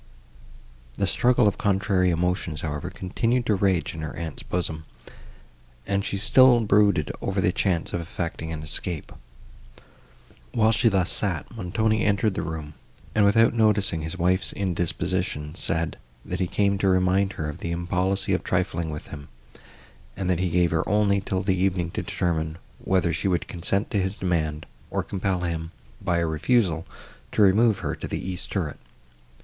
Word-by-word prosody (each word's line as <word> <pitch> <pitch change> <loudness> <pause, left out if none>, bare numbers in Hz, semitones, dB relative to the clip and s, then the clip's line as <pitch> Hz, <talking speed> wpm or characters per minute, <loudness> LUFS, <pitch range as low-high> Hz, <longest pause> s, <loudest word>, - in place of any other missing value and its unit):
The - - 0
struggle 125 -2 +3
of 100 - 0
contrary 95 -2 +2
emotions, 90 -2 -1
however, 75 +3 -3
continued 115 +7 -1
to 110 - +2
rage 95 -3 +1
in 80 - -6
her 80 - -5
aunt's 80 -3 -5
bosom, 80 -3 -3 1.0
and 100 0 0
she 100 - -2
still 120 +3 +6
brooded 100 -7 +3
over 100 0 -1
the 90 -1 +3
chance 90 -3 0
of 85 - -1
effecting 85 -1 -5
an 80 -1 -5
escape. 80 +1 -3 1.4
While 110 -2 +4
she 115 +1 +3
thus 95 -4 +1
sat, 95 0 -2
Montoni 110 +2 0
entered 100 0 +2
the - - -2
room, 80 -2 -5 0.4
and, 105 -1 +4
without 115 +3 +5
noticing 105 -7 +2
his 80 +4 -5
wife's 90 +1 +1
indisposition, 90 -3 -2
said, 80 -2 -1 0.3
that - - -4
he 90 - +1
came 100 +1 +1
to 100 - +1
remind 95 +1 +2
her 80 - -4
of 75 +3 -6
the 85 - -4
impolicy 90 +3 0
of 95 - 0
trifling 85 -3 -1
with 75 -1 -7
him, 70 -2 -9 0.9
and 95 -1 0
that 90 - +1
he 90 -1 +1
gave 85 0 +2
her 80 -1 +2
only 105 -1 +3
till 95 -1 -2
the 95 -1 +2
evening 90 -2 0
to - - -3
determine, 80 -2 -2 0.2
whether 90 -3 +1
she 100 - -1
would 90 -2 0
consent 95 +4 -1
to 105 - +1
his 95 +2 -2
demand, 80 -5 -1 0.2
or - - -1
compel 95 -2 -2
him, 80 -2 -3 0.3
by 85 - 0
a 85 - +1
refusal, 85 +1 +1 0.5
to 105 - +4
remove 105 +2 +5
her - - -1
to - - -6
the - - -3
east 90 -2 -5
turret. - - -2
90 Hz, 170 wpm, -25 LUFS, 85-100 Hz, 1.4 s, still